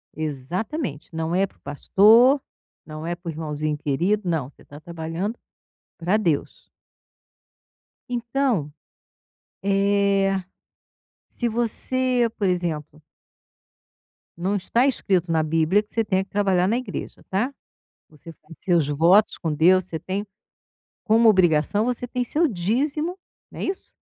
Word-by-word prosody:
Exatamente, 155 Hz, -, -4 dB
não 160 Hz, +1 st, -2 dB
é 195 Hz, +2 st, +2 dB
para -, -, -29 dB
o -, -, -36 dB
pastor, 220 Hz, -, +4 dB, 0.4 s
não 155 Hz, 0 st, -8 dB
é 170 Hz, +1 st, -2 dB
para 175 Hz, 0 st, -8 dB
o -, -, -2 dB
irmãozinho 155 Hz, -1 st, -3 dB
querido, 175 Hz, +8 st, 0 dB
não, 155 Hz, -6 st, -1 dB
você -, -, -23 dB
está 145 Hz, -, -13 dB
trabalhando 170 Hz, +7 st, -5 dB, 0.6 s
para 180 Hz, +5 st, +1 dB
Deus. 170 Hz, -9 st, -2 dB, 1.4 s
Então, 235 Hz, -, -1 dB, 0.9 s
eh, 195 Hz, -1 st, +2 dB, 0.9 s
se 240 Hz, -, -2 dB
você 240 Hz, +2 st, +1 dB
por 205 Hz, -, +1 dB
exemplo 160 Hz, -4 st, -3 dB, 1.4 s
não 185 Hz, +4 st, -1 dB
está 230 Hz, +6 st, +1 dB
escrito 185 Hz, -9 st, 0 dB
na 160 Hz, -1 st, +2 dB
bíblia 165 Hz, +6 st, +2 dB
que 210 Hz, -, -24 dB
você 225 Hz, -, +1 dB
tenha 190 Hz, -2 st, +1 dB
que 195 Hz, -, -21 dB
trabalhar 190 Hz, -3 st, +2 dB
na 225 Hz, +4 st, +1 dB
igreja 255 Hz, -, -6 dB
tá, 225 Hz, +9 st, -1 dB, 0.6 s
você 155 Hz, +2 st, -13 dB, 0.3 s
seus 170 Hz, -6 st, +1 dB
votos 170 Hz, +8 st, +4 dB
com 160 Hz, -3 st, -2 dB
Deus, 180 Hz, +4 st, +4 dB
você 165 Hz, -3 st, -5 dB
tem 195 Hz, +4 st, -4 dB, 0.8 s
como 225 Hz, +1 st, +4 dB
obrigação 185 Hz, 0 st, +3 dB
você 245 Hz, 0 st, -1 dB
tem 250 Hz, +1 st, -2 dB
seu 310 Hz, +7 st, +1 dB
dízimo, 280 Hz, -, -1 dB, 0.3 s
né -, -, -6 dB
isso? 380 Hz, -, -5 dB
190 Hz, 130 wpm, -23 LUFS, 160-225 Hz, 1.4 s, pastor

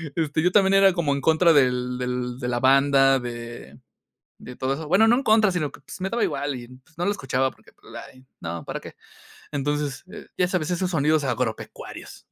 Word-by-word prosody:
este, 155 Hz, -1 st, 0 dB
yo 180 Hz, -, +3 dB
también 195 Hz, -1 st, +4 dB
era 195 Hz, -1 st, +6 dB
como 155 Hz, -5 st, 0 dB
en 140 Hz, -, -3 dB
contra 160 Hz, +3 st, +4 dB
del 125 Hz, -2 st, +2 dB
del 125 Hz, -1 st, -3 dB
de 125 Hz, -, -4 dB
la 120 Hz, 0 st, -1 dB
banda, 135 Hz, 0 st, +4 dB
de 120 Hz, -1 st, -8 dB, 0.6 s
de 125 Hz, -, -10 dB
todo 130 Hz, +1 st, -1 dB
eso. 155 Hz, +1 st, -7 dB
Bueno, 200 Hz, +7 st, +4 dB
no 240 Hz, -, +5 dB
en 270 Hz, -, -1 dB
contra, 215 Hz, -2 st, +4 dB
sino 155 Hz, -6 st, -2 dB
que, -, -, -15 dB
pues, 145 Hz, -, -11 dB
me 190 Hz, -, -1 dB
daba 235 Hz, 0 st, 0 dB
igual 145 Hz, -2 st, -2 dB
y 120 Hz, -1 st, -9 dB, 0.3 s
no 175 Hz, -, -2 dB
lo 200 Hz, -, +2 dB
escuchaba 135 Hz, -7 st, -1 dB
porque, -, -, -22 dB
pues, -, -, -18 dB, 0.2 s
ay, 130 Hz, 0 st, -19 dB, 0.2 s
no, 85 Hz, 0 st, -5 dB
¿para -, -, -5 dB
qué? -, -, -11 dB, 0.6 s
Entonces, 145 Hz, -1 st, -2 dB
eh, -, -, -10 dB
ya 180 Hz, -, +2 dB
sabes, 180 Hz, -2 st, -1 dB
esos 180 Hz, +1 st, -1 dB
sonidos 155 Hz, -1 st, +2 dB
agropecuarios. 125 Hz, -3 st, -5 dB
140 Hz, 210 wpm, -24 LUFS, 125-175 Hz, 0.6 s, era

